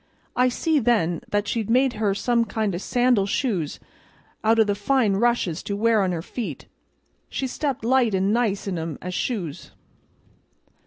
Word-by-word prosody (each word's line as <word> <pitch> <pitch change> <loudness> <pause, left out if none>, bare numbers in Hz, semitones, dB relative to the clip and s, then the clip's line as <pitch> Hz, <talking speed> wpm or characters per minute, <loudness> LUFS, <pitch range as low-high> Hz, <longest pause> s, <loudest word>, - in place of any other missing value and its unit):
I 250 0 +4
see 310 +4 +1
then 210 - +1
that 205 0 0
she'd 225 -1 -2
made 255 +2 +3
her 210 -3 0
some 235 +2 +1
kind 220 -3 -2
o' 175 - -3
sandal 245 -2 +2
shoes 195 - -1 0.6
out 225 +1 +4
o' 225 - +6
the 205 -1 0
fine 210 +1 +1
rushes 230 -7 +1
to 200 - -4
wear 225 0 +3
on 190 -2 +1
her 165 -2 -3
feet; 235 +4 -6 0.6
she 270 - -3
stepped 265 -2 -3
light 240 -4 +3
an' 190 +2 +1
nice 225 -4 0
in 185 -4 -2
'em 160 -2 -4
as 180 0 -4
shoes." 180 - -3
220 Hz, 170 wpm, -24 LUFS, 195-245 Hz, 0.6 s, o